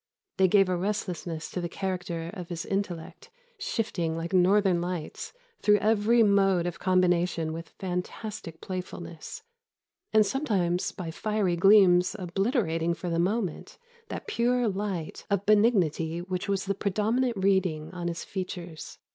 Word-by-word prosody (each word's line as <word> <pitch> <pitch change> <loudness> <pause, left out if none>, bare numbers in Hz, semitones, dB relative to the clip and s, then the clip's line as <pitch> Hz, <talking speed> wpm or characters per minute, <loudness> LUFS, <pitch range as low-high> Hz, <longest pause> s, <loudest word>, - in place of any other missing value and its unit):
They 190 0 +5
gave 195 +1 +5
a 185 - 0
restlessness 175 -4 -3
to 180 - -3
the 170 - -3
character 175 -3 -3
of 180 -4 -7
his 170 -2 -4
intellect, 190 -4 -4 0.3
shifting, 170 -8 -2
like 165 +2 -4
northern 185 -1 +4
lights, 175 -3 -4 0.3
through 210 0 +5
every 220 +3 +3
mode 195 -4 +3
of 175 -1 -4
combination 180 -3 +2
with 165 +1 -7
fantastic 180 -1 -5
playfulness; 180 - -7 0.7
and 215 -1 +5
sometimes 195 - 0
by 170 -3 -6
fiery 210 0 0
gleams 185 -1 +5
obliterating 175 - 0
for 170 +1 -4
the 165 - 0
moment 190 -1 -1 0.3
that - - -6
pure 245 - +1
light 195 -5 -3
of 200 -1 0
benignity 185 -7 +3
which 185 +2 -4
was 195 -1 0
the 200 - 0
predominant 215 +5 0
reading 185 -5 +1
on 175 -2 -4
his 170 -1 -3
features." 180 -4 -6
185 Hz, 140 wpm, -28 LUFS, 170-205 Hz, 0.7 s, They